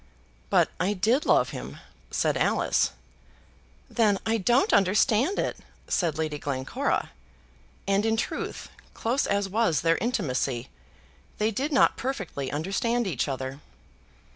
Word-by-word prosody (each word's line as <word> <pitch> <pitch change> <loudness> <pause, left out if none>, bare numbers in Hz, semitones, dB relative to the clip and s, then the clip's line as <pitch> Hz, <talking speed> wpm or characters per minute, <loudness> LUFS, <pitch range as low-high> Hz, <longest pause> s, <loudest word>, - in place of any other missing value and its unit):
"But - - +3
I 190 +3 +1
did 225 +9 +1
love - - +4
him," - - -7 0.3
said - - +1
Alice. - - +2 1.0
"Then 215 -4 +2
I 225 0 +1
don't 240 +7 +3
understand 215 - +3
it," - - -1 0.3
said 165 -4 0
Lady 155 -2 -2
Glencora; 130 -2 -2 0.8
and, 195 +1 +2
in 225 0 +1
truth, - - -4 0.3
close 245 +5 0
as 200 0 +1
was 195 -6 +1
their 165 0 +3
intimacy, 135 - -1 0.7
they 215 +1 +1
did 275 +8 -2
not 275 - +4
perfectly 195 - -4
understand 200 +10 0
each 160 -9 -1
other. 135 0 -4
200 Hz, 125 wpm, -27 LUFS, 155-230 Hz, 1.0 s, love